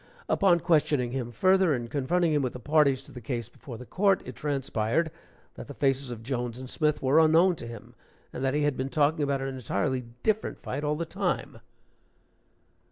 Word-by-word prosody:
Upon 175 Hz, -4 st, +3 dB
questioning 150 Hz, -7 st, +2 dB
him 125 Hz, -2 st, -3 dB
further, 185 Hz, -, +3 dB
and 120 Hz, -1 st, -4 dB
confronting 155 Hz, +6 st, +1 dB
him 145 Hz, -, +2 dB
with 130 Hz, -2 st, -2 dB
the 125 Hz, -, -7 dB
parties 140 Hz, -1 st, +3 dB
to -, -, -15 dB
the 125 Hz, -, -9 dB
case 120 Hz, -1 st, -3 dB
before 120 Hz, -5 st, -10 dB
the 125 Hz, -, -10 dB
court, 195 Hz, -, +2 dB
it 125 Hz, -, -8 dB
transpired 140 Hz, +1 st, -1 dB, 0.4 s
that -, -, -9 dB
the 145 Hz, -, -9 dB
faces 135 Hz, -1 st, 0 dB
of 115 Hz, -2 st, -7 dB
Jones 120 Hz, -1 st, -3 dB
and 130 Hz, -, -7 dB
Smith 150 Hz, +3 st, 0 dB
were 135 Hz, +4 st, +5 dB
unknown 165 Hz, +3 st, +5 dB
to 120 Hz, -, -8 dB
him, 115 Hz, 0 st, -10 dB, 0.4 s
and -, -, -5 dB
that 135 Hz, +1 st, +1 dB
he 150 Hz, -, +1 dB
had 145 Hz, -2 st, +1 dB
been 130 Hz, +1 st, -3 dB
talking 150 Hz, +3 st, +2 dB
about 140 Hz, -1 st, 0 dB
an 135 Hz, -, -2 dB
entirely 125 Hz, 0 st, -2 dB, 0.2 s
different 215 Hz, 0 st, 0 dB
fight 140 Hz, +4 st, -4 dB
all 150 Hz, 0 st, 0 dB
the 165 Hz, +2 st, -3 dB
time.) -, -, -3 dB
135 Hz, 200 wpm, -28 LUFS, 125-155 Hz, 0.4 s, were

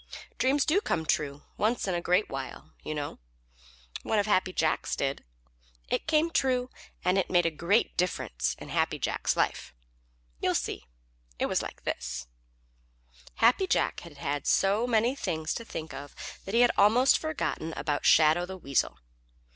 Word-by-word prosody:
Dreams 270 Hz, +2 st, +3 dB
do 370 Hz, +7 st, +3 dB
come 160 Hz, -, -1 dB
true 145 Hz, -2 st, -1 dB
once 220 Hz, +1 st, 0 dB
in 190 Hz, -, 0 dB
a 175 Hz, -, -1 dB
great 180 Hz, +4 st, +2 dB
while, 135 Hz, -1 st, -7 dB
you 155 Hz, -, -4 dB
know. 145 Hz, -1 st, -5 dB, 0.8 s
One 220 Hz, -, 0 dB
of 205 Hz, -, +2 dB
Happy 185 Hz, -3 st, +2 dB
Jack's 160 Hz, -3 st, 0 dB
did. 135 Hz, 0 st, -2 dB, 0.7 s
It -, -, -1 dB
came 320 Hz, +1 st, +3 dB
true, 255 Hz, -3 st, +1 dB, 0.3 s
and 185 Hz, +2 st, +3 dB
it 190 Hz, -, -1 dB
made 175 Hz, -2 st, +3 dB
a 165 Hz, -, +2 dB
great 170 Hz, +8 st, +1 dB
difference 165 Hz, -, -1 dB
in -, -, -10 dB
Happy -, -, 0 dB
Jack's -, -, -1 dB
life. -, -, -1 dB, 0.6 s
You -, -, +1 dB
see, 65 Hz, -2 st, -3 dB, 0.5 s
it -, -, 0 dB
was -, -, 0 dB
like -, -, -8 dB
this: 65 Hz, 0 st, -3 dB, 1.1 s
Happy 245 Hz, +12 st, +4 dB
Jack -, -, +1 dB
had 165 Hz, -4 st, -12 dB
had 145 Hz, 0 st, -3 dB
so 205 Hz, +5 st, +3 dB
many 235 Hz, +1 st, +2 dB
things 160 Hz, -, -2 dB
to 230 Hz, -, -5 dB
think 160 Hz, -8 st, -7 dB
of 145 Hz, 0 st, -9 dB, 0.3 s
that 195 Hz, -, -3 dB
he 235 Hz, -, +6 dB
had 245 Hz, -, +6 dB
almost 230 Hz, +6 st, +5 dB
forgotten 315 Hz, -, -3 dB
about 145 Hz, -2 st, -1 dB
Shadow 160 Hz, +3 st, +5 dB
the 190 Hz, 0 st, -7 dB
Weasel. 140 Hz, -6 st, 0 dB
180 Hz, 165 wpm, -28 LUFS, 155-235 Hz, 1.1 s, he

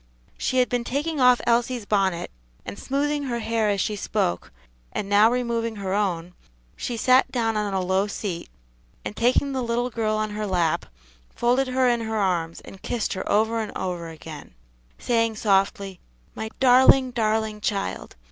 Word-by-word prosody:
She 255 Hz, -, -1 dB
had 250 Hz, -1 st, +4 dB
been 245 Hz, -1 st, -1 dB
taking 290 Hz, +5 st, -2 dB
off 250 Hz, -1 st, +6 dB
Elsie's 240 Hz, -1 st, +1 dB
bonnet, 190 Hz, -4 st, 0 dB, 0.3 s
and -, -, -7 dB
smoothing 285 Hz, +1 st, -1 dB
her 240 Hz, -3 st, -2 dB
hair 225 Hz, -1 st, 0 dB
as 200 Hz, -1 st, 0 dB
she 210 Hz, +2 st, -1 dB
spoke, 90 Hz, -, -2 dB, 0.4 s
and 200 Hz, -, -3 dB
now 205 Hz, +2 st, +5 dB
removing 235 Hz, -2 st, -1 dB
her 195 Hz, -2 st, -3 dB
own, 180 Hz, -4 st, -1 dB, 0.4 s
she 240 Hz, -, -4 dB
sat 255 Hz, +3 st, +4 dB
down 225 Hz, -3 st, 0 dB
on 210 Hz, -1 st, -1 dB
a -, -, +1 dB
low 190 Hz, +2 st, +1 dB
seat, 195 Hz, -4 st, -5 dB, 0.6 s
and -, -, -5 dB
taking 250 Hz, +5 st, +2 dB
the 265 Hz, -1 st, -2 dB
little 240 Hz, +1 st, -1 dB
girl 220 Hz, -1 st, 0 dB
on 215 Hz, 0 st, -1 dB
her 210 Hz, 0 st, -3 dB
lap, 175 Hz, -4 st, 0 dB, 0.4 s
folded 250 Hz, +3 st, +1 dB
her 255 Hz, 0 st, +2 dB
in 240 Hz, -1 st, +2 dB
her 220 Hz, -1 st, -3 dB
arms, 175 Hz, -5 st, -1 dB
and 195 Hz, -, -13 dB
kissed 235 Hz, -3 st, -2 dB
her 185 Hz, -, -4 dB
over 225 Hz, +2 st, +2 dB
and 215 Hz, -2 st, -3 dB
over 175 Hz, -3 st, -3 dB
again, 155 Hz, -, -10 dB, 0.4 s
saying 230 Hz, -2 st, +1 dB
softly, 195 Hz, -2 st, 0 dB, 0.3 s
"My 220 Hz, -, -5 dB
darling, 260 Hz, 0 st, +6 dB
darling 220 Hz, -2 st, -1 dB
child! 200 Hz, -2 st, -3 dB
220 Hz, 170 wpm, -24 LUFS, 195-245 Hz, 0.6 s, off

